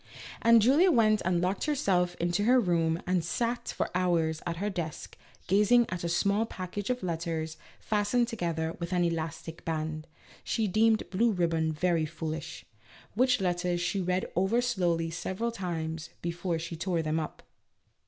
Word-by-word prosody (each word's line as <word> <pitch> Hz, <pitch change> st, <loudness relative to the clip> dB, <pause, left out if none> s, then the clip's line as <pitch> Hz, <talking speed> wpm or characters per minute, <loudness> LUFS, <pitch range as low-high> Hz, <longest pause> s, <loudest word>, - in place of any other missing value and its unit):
And 230 Hz, -1 st, +6 dB
Julia 295 Hz, -, +5 dB
went 215 Hz, -, +4 dB
and 175 Hz, -1 st, +1 dB
locked 185 Hz, +2 st, 0 dB
herself 190 Hz, -12 st, +1 dB
into 175 Hz, +4 st, 0 dB
her 255 Hz, +2 st, +5 dB
room 170 Hz, -5 st, +1 dB
and 180 Hz, -2 st, +1 dB
sat 235 Hz, +8 st, -2 dB
for -, -, -2 dB
hours 170 Hz, -3 st, +1 dB
at 170 Hz, -1 st, -2 dB
her 200 Hz, +4 st, -2 dB
desk 170 Hz, -4 st, -5 dB, 0.3 s
gazing 210 Hz, +5 st, +4 dB
at 180 Hz, -1 st, -4 dB
a 170 Hz, -, -1 dB
small 200 Hz, +6 st, +1 dB
package 190 Hz, +1 st, -5 dB
of 250 Hz, -3 st, -1 dB
letters 165 Hz, -2 st, -3 dB, 0.2 s
fastened 215 Hz, +3 st, +1 dB
together 170 Hz, -8 st, -2 dB
with 170 Hz, +1 st, -4 dB
an 175 Hz, -1 st, +2 dB
elastic 165 Hz, -1 st, -3 dB
band 155 Hz, -1 st, -3 dB, 0.4 s
(she 220 Hz, -2 st, 0 dB
deemed 220 Hz, +3 st, +3 dB
blue 225 Hz, +5 st, +3 dB
ribbon 165 Hz, -4 st, +1 dB
very 165 Hz, 0 st, +1 dB
foolish), 160 Hz, 0 st, -6 dB, 0.5 s
which 250 Hz, +2 st, +3 dB
letters 175 Hz, -1 st, 0 dB
she 185 Hz, +3 st, -1 dB
read 180 Hz, +1 st, 0 dB
over 190 Hz, +6 st, +2 dB
slowly 175 Hz, -9 st, 0 dB
several 190 Hz, +7 st, -3 dB
times 165 Hz, -5 st, -4 dB
before 170 Hz, 0 st, -2 dB
she 165 Hz, +1 st, -5 dB
tore 170 Hz, 0 st, -1 dB
them 155 Hz, +1 st, 0 dB
up. 155 Hz, -, -6 dB
175 Hz, 160 wpm, -29 LUFS, 165-210 Hz, 0.5 s, And